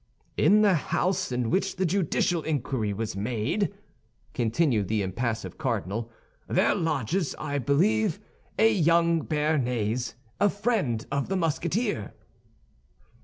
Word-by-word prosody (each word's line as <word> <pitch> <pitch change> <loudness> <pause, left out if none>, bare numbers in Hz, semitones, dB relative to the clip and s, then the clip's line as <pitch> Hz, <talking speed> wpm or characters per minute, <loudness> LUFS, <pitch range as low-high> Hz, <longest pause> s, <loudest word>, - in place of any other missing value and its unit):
"In 205 +8 +5
the 200 -2 +5
house 180 +2 0
in 125 -2 -1
which 195 +1 0
the 190 0 0
judicial 175 -1 +1
inquiry 130 -8 -1
was 105 0 -3
made," 120 - -1 0.6
continued 115 - +1
the 105 0 0
impassive 110 +4 -3
cardinal, 110 +6 -2 0.4
"there - - +3
lodges, 160 - -1
I 145 -1 -2
believe, 120 - +2 0.4
a 225 0 +5
young 170 -2 +3
Béarnais, 125 -7 0 0.2
a 205 - +4
friend 200 - -1
of 140 +2 -1
the 195 - 0
Musketeer." 170 - -1
145 Hz, 120 wpm, -27 LUFS, 115-180 Hz, 0.6 s, In